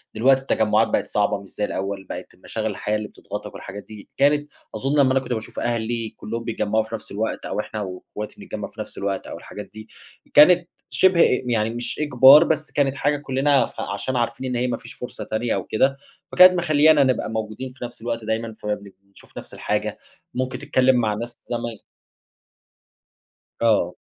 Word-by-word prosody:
دلوقتي 130 +4 +4
التجمعات 110 -4 +2
بقت - - 0
صعبة 105 -1 0
مش 100 - -14
زي 105 - -2
الأول 95 0 -4
بقت - - -7
المشاغل - - -4
الحياة 105 - -2
اللي 105 0 -5
بتضغطَك - - -8
والحاجات 100 +1 -8
دي. 105 0 -13
كانت 145 +1 +2 0.2
أظن 140 +2 0
لمّا 130 -2 +5
أنا 135 - +3
كنت 125 -2 -4
باشوف 110 -1 -5
أهلي 115 -1 -1
كُلّهم 115 +2 -5
بيتجمّعوا 110 0 0
في 110 - -6
نفس 110 - -9
الوقت، 110 +3 -3
أو - - -3
إحنا 105 0 -4
واخواتي 100 +2 -7
نتجمّع - - -5
في - - -19
نفس - - -9
الوقت، 100 -1 -3
أو - - -7
الحاجات 105 - -9
دي. 110 0 -10 0.5
كانت 175 +3 +7 0.2
شِبه 185 -3 +4
أ 125 - +4
يعني 115 -3 +1
مش 120 +4 -1
إجبار 145 +1 +8
بس 155 -2 -1
كانت 140 -1 +1
حاجة 145 +1 +1
كُلّنا 140 0 +2
فعشان 100 +6 -4
عارفين 120 +2 -1
إن 125 - -2
هي 125 +1 0
ما 125 - -1
فيش 115 - -11
فرصة 125 - -7
تانية 110 +1 -1
أو 95 - -2
كده، 135 +5 +1 0.4
فكانت 185 0 +9
مخلّيانا 155 -3 +4
نبقى 130 -4 0
موجودين 110 +4 -4
في 125 -1 -8
نَفس 120 -1 -11
الوقت 115 -1 -3
دايمًا. 110 +1 -2
فَبنب 105 -2 -5
بنشوف 100 0 -19
نَفس - - -9
الحاجة، - - -2 0.4
مُمكن 130 +1 -2
تتكلم 130 0 +3
مع 110 -3 +1
ناس 120 +3 -5
زماي 120 -2 -3 1.8
آه. 105 -6 +2
120 Hz, 185 wpm, -23 LUFS, 105-135 Hz, 1.8 s, فكانت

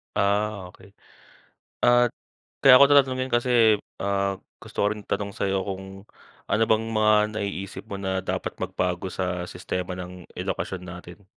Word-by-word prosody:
Ah, 100 -1 0
okey. 95 +2 -18 0.9
At 120 0 +5 0.5
kaya 135 -2 +8
ko - - +11
'to 145 - +8
tatanungin 130 -1 0
kasi, 120 -3 +4 0.2
ah, 100 0 0 0.2
gusto - - -14
ko - - +3
rin 105 -1 -6
tanong 100 0 -2
sa'yo 95 -1 -1
kung 95 0 -5 0.7
ano 105 +3 +2
bang 110 0 +2
mga 110 -1 +3 0.3
naiisip 100 -1 -5
mo - - -7
na 95 -1 -2
dapat 95 - -4
magbago 90 0 -2
sa 90 -1 -3
sistema 90 0 -4
ng 90 -1 -9
edukasyon 95 -1 -4
natin? 90 +2 -11
100 Hz, 150 wpm, -25 LUFS, 95-110 Hz, 0.9 s, ko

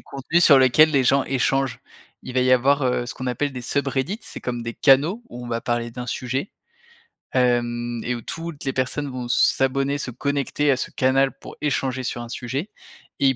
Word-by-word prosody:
contenu 140 +5 -1
sur 145 -5 +7
lequel 130 +4 +6
les 140 -3 +2
gens 135 +1 +3
échangent. 135 0 0 0.4
Il 130 - -8
va 130 - +3
y 130 0 +3
avoir, 140 +3 +3
heu, 125 -1 +1
ce - - -6
qu'on 130 - -6
appelle 135 +3 -1
des 125 -1 -6
SubReddit. 140 - -1
C'est - - -9
comme 120 -1 -4
des 115 0 -5
canaux 150 - +3
où 125 - -9
on - - -7
va 115 -1 -2
parler 120 -1 -1
d'un 125 +1 -7
sujet, 130 - -3 0.8
hem 120 -2 0
et 125 0 -1
où 120 - -7
toutes 165 +1 -7
les 135 - -1
personnes 135 +2 -2
vont 125 -1 -5
s'abonner, 135 +3 +2
se 135 -3 -5
connecter 140 +3 -1
à 130 - +2
ce - - -4
canal 135 +1 +2
pour - - -11
échanger 130 -3 -1
sur 120 -1 -3
un 120 - -8
sujet 135 - -4 0.5
et 135 - +4
ils 130 - +1
130 Hz, 205 wpm, -23 LUFS, 125-140 Hz, 0.8 s, sur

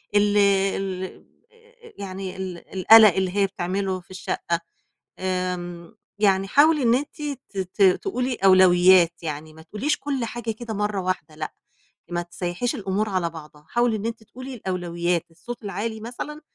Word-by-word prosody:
ال 205 0 +4
ال 195 -2 0 0.7
يعني 190 -1 -6
ال 185 -2 -7
القلق 215 0 +8
اللي 190 0 -1
هي 200 -1 +4
بتعمله 190 0 -2
في 180 - -20
الشَّقَّة، 170 -2 -2 0.6
آمم 180 -2 -3 0.2
يعني 195 -2 +3
حاولي 295 +4 +4
إن 235 +1 +4
أنتِ 290 +2 -4 0.3
ت 200 - -12
ت 190 +2 -4
تقولي 250 - +2
أولويَّات، 185 -3 +5
يعني 155 0 -5
ما 160 - -14
تقوليش 215 - -2
كُلّ 270 -4 -2
حاجة 235 -1 -4
كده 225 0 -6
مَرَّة 210 -1 -1
واحدة 170 -4 -3
لأ، 155 0 -5 0.6
ما 175 0 0
تسيَّحيش 175 +6 -3
الأمور 205 +1 -1
على 180 -3 0
بعضها، 150 -2 -12
حاولي 240 -1 +2
إن 210 - -6
أنتِ 230 -1 -4
تقولي 255 +4 -9
الأولويَّات، 175 -4 -2
الصَّوت 235 +8 -9
العالي 215 +3 -3
مثلًا، 295 +6 -6
190 Hz, 150 wpm, -24 LUFS, 175-220 Hz, 0.7 s, القلق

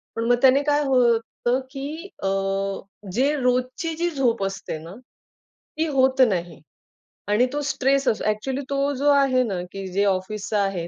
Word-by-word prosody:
पण 230 - -2
मग 245 - +5
त्याने 270 +1 +6
काय 295 0 +2
होतं, 245 -1 +1
की 305 +6 -6
अ, - - +1 0.9
जे 275 +7 +2
रोजची 255 +6 0
जी 345 +2 0
झोप 250 - 0
असते 195 -4 -5
ना, 170 +4 -10 0.8
ती 320 - +1
होत 265 -2 +2
नाही. 175 -4 -3 0.7
आणि 210 +4 +4
तो 295 - -1
स्ट्रेस 275 -1 +1
असतो - - +1
ॲक्चुअली 255 +6 -2
तो 280 +1 0
जो 285 +3 +1
आहे 275 -2 +3
ना, 195 -7 -3
की 195 -1 -6
जे 200 +2 +2
ऑफिसचा 200 +2 -1
आहे, 190 -4 -2
255 Hz, 160 wpm, -23 LUFS, 210-275 Hz, 0.9 s, त्याने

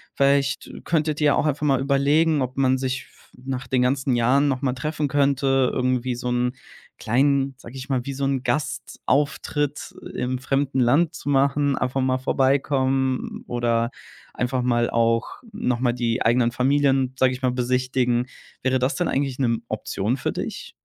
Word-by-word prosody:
Vielleicht, 140 0 +2
äh, - - -10
könntet 155 -2 0
ihr 150 - +4
ja 145 - +4
auch - - +1
einfach 150 0 -1
mal 135 -3 +3
überlegen, 145 +3 +2
ob 130 0 -3
man 130 -1 +3
sich 130 0 -3
v - - -25 0.3
nach 130 -1 -4
den 125 -1 +1
ganzen 130 0 +1
Jahren 130 +5 +3
nochmal 130 -1 0
treffen 150 +3 -2
könnte. 135 -1 +2
Irgendwie 125 -1 0
so 125 +1 -5
'n 125 +1 0 0.4
kleinen, 135 +3 +1
sage 125 -1 -12
ich 130 +1 -7
mal, 130 -3 -1
wie 140 - -3
so 135 +1 -2
'n 135 -2 -1
Gastauftritt 145 +1 -2 0.2
im 125 +1 -2
fremden 135 0 -1
Land 150 +7 +3
zu 145 - -6
machen, 140 0 +2
einfach 130 +1 -1
mal 130 0 +1
vorbeikommen 130 0 0
oder 120 -1 0 0.4
einfach 125 +1 -1
mal 120 -1 +1
auch 115 0 0
nochmal 125 - 0
die 120 -1 -1
eigenen 120 0 +3
Familien, 135 0 +2
sage 130 -1 +3
ich 125 - -8
mal, 125 - +2
besichtigen. 125 -1 0 0.4
Wäre 130 0 +2
das 130 +5 0
denn 175 - 0
eigentlich 135 -1 -1
'ne 135 - +2
m 115 -1 -1
Option 110 +3 -2
für - - -2
dich? - - -6
130 Hz, 175 wpm, -23 LUFS, 125-140 Hz, 0.4 s, ihr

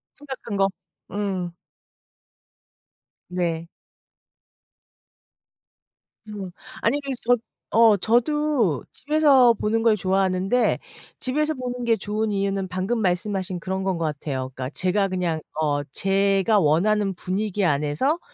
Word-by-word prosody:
심각한 265 -7 -6
거. 195 0 +3 0.4
음. 190 -4 -2 1.7
네. 170 -2 -2 2.6
음. 200 -4 -6 0.3
아니 290 - +2
그래서 270 -3 -4
저 245 - +6 0.4
어 225 -2 +7
저도 240 - +1
집에서 280 -5 +4
보는 225 +1 0
걸 225 -2 +4
좋아하는데 190 +4 +1 0.4
집에서 300 +4 0
보는 250 -1 -4
게 230 -1 +4
좋은 215 +2 -2
이유는 195 -1 -1
방금 190 +6 -1
말씀하신 185 0 -1
그런 190 +2 -3
건 190 -2 0
것 165 - -1
같아요. 140 -3 -3
그러니까 130 0 -4
제가 185 +6 +1
그냥 180 -4 -1 0.2
어 145 -2 +1
제가 195 +5 +2
원하는 195 +5 +2
분위기 200 +2 -1
안에서 150 - +1
195 Hz, 230 characters per minute, -24 LUFS, 180-230 Hz, 2.6 s, 어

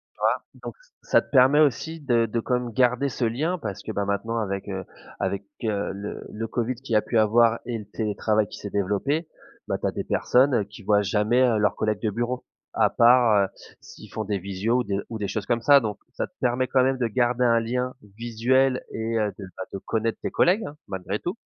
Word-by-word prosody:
Tu - - -37
vois, - - +2 0.2
donc - - -6
ç - - -34 0.2
ça - - +3
te - - -24
permet 135 +2 +6
aussi 155 +3 +1
de 120 -5 +2
de 115 +2 -2
quand 125 - -1
même 125 -1 -1
garder 125 +3 +2
ce 125 -1 -2
lien 155 +11 0
parce 105 - -6
que, - - -7
bah, 100 - -1
maintenant 100 +3 -2
avec, 100 -2 -3
heu, 95 -1 -4 0.3
avec, 95 +1 -2 0.2
heu, 105 -3 -1
le 100 +2 -6
le 115 +2 -4
covid 120 +1 -1
qui 125 -1 -4
a 105 - +4
pu 115 - 0
avoir 115 +2 +4
et 120 -2 -3
le 105 - -8
télétravail 105 0 0
qui - - -9
s'est 100 - -7
développé, 105 - -1 0.4
bah, - - -1
tu - - -2
as - - 0
des - - -4
personnes 125 -5 +2
qui 105 +2 -13
voient 105 +1 +3
jamais, 105 +5 +2
heu, 120 -3 +3
leurs 105 -1 +1
collègues 110 -1 -1
de 110 - +1
bureau. 120 +4 -3 0.3
À - - +3
part, 115 -4 +5
heu, - - -13 0.3
s'ils - - -13
font 110 - -3
des 100 -1 -1
visios 100 +6 -1
ou 125 - 0
des 100 -1 -2
ou 115 - -5
des 105 - -2
choses 100 +1 -3
comme 120 -1 0
ça, 140 +3 +7
donc 105 -4 -4
ça - - -3
te - - -29
permet 125 +1 +1
quand 130 - +3
même 130 0 +1
de 120 - +1
garder 120 +2 +1
un 115 -1 +4
lien 125 +2 -2 0.2
visuel 125 +3 +1
et 115 +1 -2
heu, 105 -1 +1
de 100 - -7
ben, 95 - -4
de 100 - -4
connaître 110 +3 -2
tes - - -2
collègues 190 +6 +3
hein, 145 - -9
malgré 95 +1 -3
tout. 175 - -4
115 Hz, 235 wpm, -25 LUFS, 105-125 Hz, 0.4 s, ça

